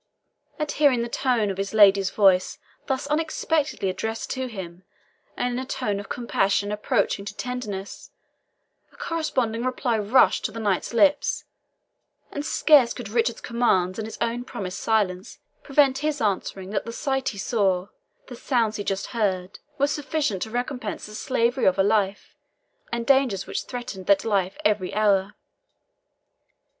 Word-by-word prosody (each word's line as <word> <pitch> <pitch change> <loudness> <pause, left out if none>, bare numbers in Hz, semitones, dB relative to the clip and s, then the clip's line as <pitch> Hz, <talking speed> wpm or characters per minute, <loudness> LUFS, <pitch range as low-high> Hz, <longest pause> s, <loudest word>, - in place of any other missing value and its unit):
At 300 -2 -2
hearing 275 -5 +3
the - - -3
tones 235 -4 0
of 190 - -6
his 195 +2 -3
lady's 195 -2 +6
voice 190 -2 +3 0.3
thus 265 0 -1
unexpectedly 305 -4 0
addressed 220 +5 -3
to 260 -1 -2
him, 185 -6 -8 0.6
and 245 0 -1
in 245 - -2
a - - -3
tone 205 -6 -2
of 200 - -9
compassion 205 -4 0
approaching 210 -1 0
to 200 0 -8
tenderness, 215 -6 -5 0.8
a - - -22
corresponding 255 -9 -1
reply 250 -2 0
rushed 215 +6 +4
to - - -1
the 230 - -7
knight's 200 -4 0
lips, 285 +5 +2 0.9
and 285 - -4
scarce 295 -5 +4
could 240 -5 -7
Richard's 235 +1 0
commands 195 -6 +1
and 220 - -3
his 225 - -8
own 235 +1 -1
promised 190 -7 -6
silence 200 -4 0 0.2
prevent 275 -2 +3
his 300 0 -1
answering 195 -2 -2
that 205 - -2
the 230 - -5
sight 270 +1 -1
he 200 - -8
saw, 195 -3 0 0.4
the 250 - -9
sounds 230 -4 0
he 205 - -3
just 195 -1 -2
heard, 195 -4 -1 0.2
were 280 - +3
sufficient 290 - -1
to 220 - -3
recompense 245 -1 -4
the 210 - -11
slavery 245 +2 0
of 190 - +4
a 195 - +4
life, 205 -1 0 0.6
and 235 0 -2
dangers 265 -8 +3
which - - -4
threatened 240 -7 -7
that 200 +1 +4
life 195 -3 0
every 205 -3 +1
hour. 200 -2 +2
220 Hz, 155 wpm, -24 LUFS, 195-255 Hz, 0.9 s, lady's